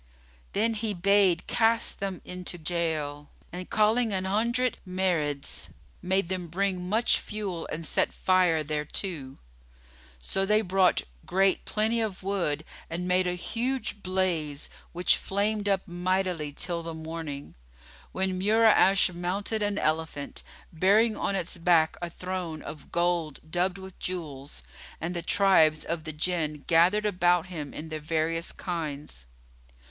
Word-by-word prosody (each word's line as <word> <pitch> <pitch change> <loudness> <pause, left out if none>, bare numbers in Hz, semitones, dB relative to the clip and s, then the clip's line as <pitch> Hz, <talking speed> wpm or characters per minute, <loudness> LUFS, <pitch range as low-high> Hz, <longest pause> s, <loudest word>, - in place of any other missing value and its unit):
Then 225 +3 +2
he 215 -1 -2
bade 195 -1 +4
cast 230 0 +2
them 195 -2 -4
into 180 -1 -5
gaol; 155 -3 -2 0.2
and, 180 0 -6
calling 220 +2 +3
an 190 -1 -1
hundred 235 +5 +1
Marids, 170 -7 -1 0.3
made 190 0 +1
them 180 -1 -3
bring 180 +1 -1
much 225 +4 +3
fuel 200 -6 -4
and 165 +1 -4
set - - +1
fire 180 -4 +3
thereto. 150 -1 -3 0.8
So 195 - 0
they 210 +2 +3
brought 190 -2 +3 0.2
great 190 +1 +2
plenty 220 +2 +1
of 205 -4 -3
wood 175 -6 -1 0.2
and 175 +2 -3
made 180 0 +3
a 180 - +1
huge 230 +2 -2
blaze, 175 -6 -1 0.2
which 175 +1 +3
flamed 205 +1 -1
up 195 0 +1
mightily 180 -3 -1
till 170 +3 -2
the 165 -1 -6
morning, 160 -3 -6 0.6
when 190 -1 -1
Mura'ash 200 -2 +5
mounted 195 +5 -2
an 205 -1 0
elephant, 155 -3 -2 0.3
bearing 210 +7 +4
on 200 - -1
its 180 -2 -2
back 165 -2 +4
a 175 - -3
throne 180 -3 -5
of 150 -2 -9
gold 170 -3 0
dubbed 180 +2 +1
with 190 -1 -11
jewels, 150 -6 -5 0.4
and 170 +3 -3
the 170 - -1
tribes 165 -4 +4
of 165 -1 -3
the 155 - -3
Jinn 155 -2 -2
gathered 180 +6 +4
about 180 -3 +3
him 160 -6 -6
in 160 +1 -7
their 155 0 -4
various 165 +2 -1
kinds. 150 - -5
180 Hz, 140 wpm, -28 LUFS, 160-195 Hz, 0.8 s, Mura'ash